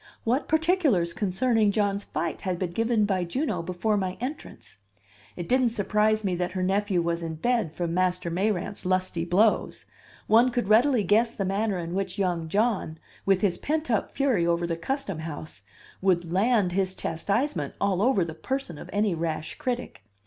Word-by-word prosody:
What 250 +6 0
particulars 315 - +2
concerning 215 +2 +1
John's 200 -1 0
fight - - -3
had 185 -3 -2
been 175 -1 -3
given 225 +2 +1
by 190 -3 0
Juno 195 - -2
before 185 +5 -1
my 185 -2 -2
entrance? 260 - -7 0.6
It 170 - -6
didn't 255 -1 +3
surprise 215 0 +1
me 190 -2 0
that 180 0 -2
her 185 -1 -1
nephew 195 -1 +1
was 170 0 -1
in 165 -1 -4
bed 230 -1 0
from 170 +1 -3
Master 180 -1 0
Mayrant's 195 +2 -1
lusty 185 -2 0
blows. 205 +6 +2 0.4
One 230 +4 +5
could 240 -4 -1
readily 235 +2 +4
guess 225 +5 +2
the 195 - -2
manner 200 +1 0
in 170 0 -4
which 190 0 -2
young 175 -4 -1
John, 205 -5 0 0.3
with 195 -1 +3
his 185 -4 +1
pent 310 -2 -1
up 220 - +1
fury 250 -12 +1
over 170 0 +1
the 170 -1 -1
custom 195 - -3
house, 155 -7 -7 0.4
would 175 -3 +1
"land" 205 -1 +3
his 190 0 0
chastisement 175 - -1
all 195 -2 +1
over 215 -6 +3
the 160 - -6
person 175 - -4
of - - -10
any 205 -1 +1
rash 160 -1 -3
critic! 245 - -3
195 Hz, 175 wpm, -26 LUFS, 175-225 Hz, 0.6 s, One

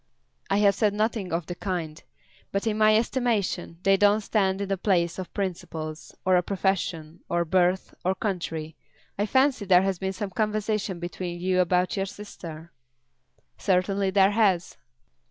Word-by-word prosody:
"I 195 - +2
have 205 -1 +5
said 210 -1 +1
nothing 215 -3 -1
of 165 0 -1
the 175 - -5
kind. 170 -4 -4 0.5
But 200 +2 -1
in 220 -2 +1
my 215 0 +5
estimation 225 -8 -1
they 195 0 +4
don't 205 +2 +4
stand 195 -2 +1
in 200 - -2
the 195 - 0
place 175 -3 +1
of 185 - -6
principles, 165 -5 -5
or 185 -1 +5
a - - +3
profession, 175 -4 -2
or 170 0 +1
birth, 180 +2 +1
or 185 +1 +1
country. 165 -6 -3 0.4
I 205 - +1
fancy 260 -1 +3
there 185 -2 +5
has 190 -2 -1
been 190 0 -2
some 195 +1 -4
conversation 210 -2 -1
between 175 0 -5
you 185 +1 +1
about 180 0 +2
your 195 0 0
sister." 170 -5 -9 0.9
"Certainly 195 +1 +1
there 195 +1 +4
has." 200 -5 +2
190 Hz, 160 wpm, -26 LUFS, 175-205 Hz, 0.9 s, have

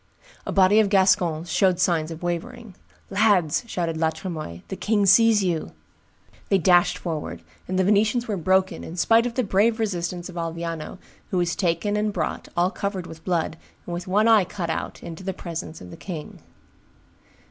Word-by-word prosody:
A - - -1
body 195 +2 +5
of 215 -2 +3
Gascons 185 -4 +2
showed 185 -1 +2
signs 165 -3 +1
of 165 +1 -8
wavering: 175 +5 -4 0.4
"Lads," 195 -6 +3
shouted 170 -6 -2
La 160 0 +2
Tremoille, 155 - -6
"the - - -4
king 210 0 +1
sees 215 +1 +5
you." 170 -4 -2 0.8
They 195 - +4
dashed 175 -1 +4
forward; 150 - -5 0.2
and 185 - -2
the 190 - +3
Venetians 215 +5 +2
were 210 - -1
broken, 190 +2 +1
in 165 - -8
spite 225 +6 +3
of 235 - -6
the 255 - +1
brave 215 +3 +2
resistance 175 -4 -2
of 180 -2 -10
Alviano, 165 0 -4 0.3
who 185 - -1
was 175 -1 0
taken 180 +3 0
and 210 0 0
brought, 165 -6 -3
all 175 +2 +3
covered 200 -4 -3
with 160 -2 -11
blood, 165 -3 -1 0.3
and 175 - -5
with 175 +2 -5
one 210 +4 +3
eye 215 -5 +5 0.2
out, - - -4
into 165 +2 -8
the 190 0 -3
presence 165 -1 -6
of 90 - -10
the - - -10
king. 165 -6 -7
180 Hz, 180 wpm, -24 LUFS, 165-205 Hz, 0.8 s, body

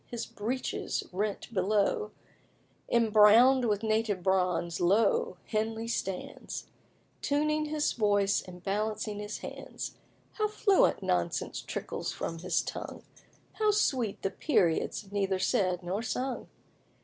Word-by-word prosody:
his 235 -2 -4
breeches 240 +5 -3
rent 205 +4 -3
below, 210 - +1 0.8
Imbrown'd 230 +3 +6
with 210 -1 0
native 215 -4 0
bronze, 180 -3 +1
lo! 195 0 +2
Henley 220 +1 -2
stands, 195 -5 -4 0.6
Tuning 305 +1 +1
his 300 0 0
voice 205 -3 +2
and 180 -1 -12
balancing 210 +1 -2
his 210 0 -5
hands. - - -7 0.4
How 430 -1 +1
fluent 415 -2 +3
nonsense 85 -1 -1
trickles - - -4
from 165 - -4
his 170 - 0
tongue! - - -6 0.6
How 430 -1 +3
sweet 260 - +1
the 195 - 0
periods, 200 - 0
neither 195 -2 0
said 185 -1 +1
nor 185 +5 -2
sung! 255 +2 -3
210 Hz, 115 wpm, -30 LUFS, 190-240 Hz, 0.8 s, Imbrown'd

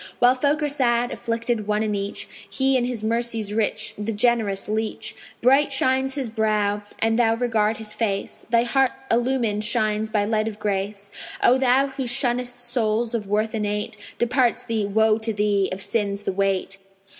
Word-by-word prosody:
While 245 +1 +5
folk 285 +4 0
are - - +2
sad, 245 -4 +1
afflicted 230 -2 -2
one 210 0 +1
and 210 -1 -1
each, 200 0 -4 0.2
He 265 0 +2
in 250 -2 +2
his 245 -3 -3
mercy's 230 -2 -1
rich, 215 0 +1
the 210 +2 -2
generous 220 -3 +1
leach: 215 0 -3 0.3
Bright 275 +3 +4
shines 265 0 +1
his 275 -4 -2
brow; 215 -2 0 0.2
an 225 0 +1
thou 225 -2 +3
regard 225 -2 +1
his 215 -1 -5
face 210 -3 -3
Thy 235 0 +4
heart 265 +2 +2 0.2
illumined 235 -3 +1
shines 215 0 0
by 210 -2 +1
light 215 0 0
of 215 -2 -5
grace. 200 0 -3 0.3
O 245 - +6
thou 260 +1 +4
who 270 -2 -4
shunnest 245 0 0
souls 230 -1 0
of 215 -4 -2
worth 215 +2 0
innate 210 -1 -2 0.2
Departs 245 0 +1
thee 225 -4 -1
(woe 220 +1 +3
to 225 0 -1
thee!) 205 -2 +1
of 190 +1 -4
sins 205 -2 -1
the 195 - -2
weight. 195 0 -1
225 Hz, 175 wpm, -23 LUFS, 210-245 Hz, 0.3 s, O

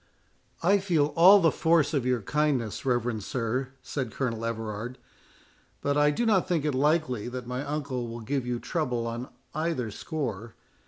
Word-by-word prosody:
"I 200 +4 +5
feel 165 -6 +1
all 185 +4 +8
the 165 -4 +4
force 165 -2 +2
of 135 -4 0
your 125 -4 +1
kindness, 135 -4 0
reverend 120 -3 0
sir," 125 +3 -2
said 130 -5 -3
Colonel 115 -2 -2
Everard, 115 +1 -4 0.8
"but 140 0 0
I 145 0 +4
do 190 +11 0
not 200 -6 +3
think 170 -5 0
it 150 - +1
likely 140 -4 +1
that 125 0 -5
my 125 +2 -3
uncle 140 -4 -3
will 115 0 -7
give 135 +4 -1
you 125 -1 -1
trouble 125 -9 -2
on 115 +2 -4 0.2
either 155 -8 -1
score. 115 -5 -4
130 Hz, 165 wpm, -28 LUFS, 120-155 Hz, 0.8 s, all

